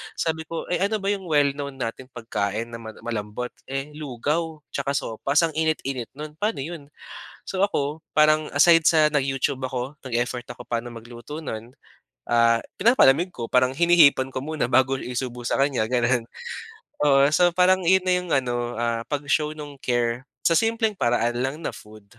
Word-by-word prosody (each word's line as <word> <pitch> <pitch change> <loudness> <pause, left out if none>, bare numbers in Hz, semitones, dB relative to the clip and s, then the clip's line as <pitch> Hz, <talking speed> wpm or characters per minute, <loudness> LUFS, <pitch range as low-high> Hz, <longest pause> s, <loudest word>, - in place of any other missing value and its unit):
Sabi 160 -1 -2
ko, 165 0 -4
eh, 180 - +1
"Ano 200 +3 +1
ba 200 -1 -1
yung 195 -3 -4
well 145 -3 +3
known 140 -1 -6
nating 125 0 -5
pagkain 110 -1 -3
na 115 - -7
mala 110 -1 -11
malambot?" 115 +1 -4 0.2
Eh, 135 +2 -4
lugaw 150 +3 -3
'tsaka 140 0 -2
sopas, 140 +7 0
ang 165 - +1
init-init 155 -6 -1
nun 150 +1 -9
paano 210 -9 -1
yun? 155 -2 -8 0.6
So, 190 +1 +2
ako 150 -4 -3
parang 155 0 +4
aside 165 +3 +6
sa 155 -2 +5
nag-YouTube 135 -1 0
ako, 130 +3 -4
nag-effort 120 0 -2
ako 120 - -13
paano 120 0 -3
magluto 120 +6 -9
nun, 115 -4 -7 0.5
ah, 115 -1 +4 0.2
pinapalamig 180 - +4
ko 120 -9 -6
parang 125 +2 +3
hinihipan 140 -3 +4
ko 130 - -3
muna 155 -2 -2
bago 130 +2 +2
isubo 125 -1 -5
sa - - 0
kanya 135 -5 +1
ganun. 120 0 +1 0.8
Oo, 135 -1 +6
so 175 +1 +3
parang 185 +1 +4
yun 190 0 +4
na 185 - +2
yung 180 0 0
ano, 120 -2 -2
ah, 115 0 -1
pag-show 150 +1 -1
nung 145 -2 -9
care, 120 +1 -1 0.2
sa - - +4
simpleng 225 +5 +2
paraan 120 - 0
lang 135 +3 -1
na - - -2
food. 110 -1 -14
135 Hz, 170 wpm, -24 LUFS, 120-160 Hz, 0.8 s, aside